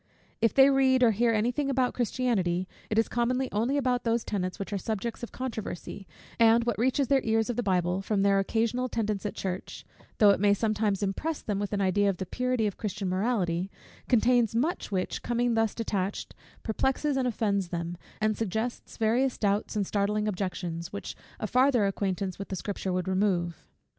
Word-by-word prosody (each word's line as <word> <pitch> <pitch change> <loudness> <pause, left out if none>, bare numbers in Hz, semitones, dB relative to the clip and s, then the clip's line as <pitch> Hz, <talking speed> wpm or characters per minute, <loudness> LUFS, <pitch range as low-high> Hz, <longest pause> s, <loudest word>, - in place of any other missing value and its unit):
If 230 - +2
they 270 0 +7
read 260 -1 +4
or 235 - +6
hear 230 +3 +2
any 225 +2 +2
thing 275 +2 -1
about 260 -2 +1
Christianity, 205 -8 0 0.2
it 215 - -1
is 225 - +4
commonly 250 +2 0
only 235 +7 +1
about 250 -3 +1
those 230 0 +1
tenets 185 -3 -3
which 200 +1 -5
are - - 0
subjects 220 +2 -3
of 235 - -6
controversy: 220 -6 -6 0.3
and 230 0 +6
what 230 -3 -1
reaches 260 +3 +2
their 275 0 +3
ears 225 +1 +1
of - - -5
the 245 - 0
Bible, 180 -3 +1
from 195 0 0
their 200 0 +4
occasional 230 +5 0
attendance 215 -4 -2
at - - -6
church; 185 -1 -5 0.3
though 210 -2 +7
it - - +1
may 205 0 +4
sometimes 215 -2 0
impress 295 +11 -2
them 205 -2 -2
with 205 -1 -3
an 205 -1 0
idea 200 +1 +2
of 190 - -1
the 190 - -4
purity 250 +3 -1
of 205 - -2
Christian 205 -3 -3
morality, 185 -3 0 0.4
contains 240 -2 +3
much 290 +4 -1
which, 185 -2 -2
coming 240 0 0
thus 225 -1 +1
detached, 200 -4 -3 0.3
perplexes 265 +5 0
and 260 -1 +1
offends 200 -5 0
them, 170 0 -4 0.2
and 215 0 +1
suggests 225 +3 -3
various 240 +4 +1
doubts 205 +1 0
and 205 -2 +1
startling 210 +2 0
objections, 180 -4 -3
which 200 - -6 0.2
a - - -2
farther 250 -1 +3
acquaintance 195 -1 -2
with 200 - -5
the 190 - -4
Scripture 195 0 -3
would 180 0 -1
remove. 185 -3 0
215 Hz, 190 wpm, -28 LUFS, 195-240 Hz, 0.4 s, they